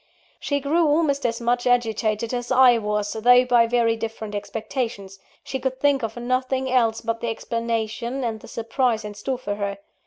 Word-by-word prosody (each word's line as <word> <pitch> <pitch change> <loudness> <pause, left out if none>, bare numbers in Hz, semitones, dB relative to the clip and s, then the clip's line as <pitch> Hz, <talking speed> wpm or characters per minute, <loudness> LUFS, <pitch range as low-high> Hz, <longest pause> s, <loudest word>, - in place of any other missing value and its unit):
She 285 -1 -1
grew 310 +4 +2
almost 290 -3 +2
as 230 0 -3
much 245 +1 0
agitated 225 -2 +1
as 245 0 -3
I 250 -2 +6
was, 210 -1 -2
though 245 +3 +5
by 240 -2 +4
very 230 -1 +2
different 225 -1 -6
expectations 205 -2 -4 0.2
she 265 - -4
could 260 0 -3
think 280 -1 +2
of 225 0 -4
nothing 255 +2 -1
else 230 -3 +2
but 230 0 -3
the 235 - -1
explanation 230 +2 -3
and 225 -2 -2
the - - -13
surprise 230 -1 -1
in 210 - -6
store 250 +6 -3
for 205 -5 -4
her. 200 -1 -3
235 Hz, 180 wpm, -23 LUFS, 220-255 Hz, 0.2 s, I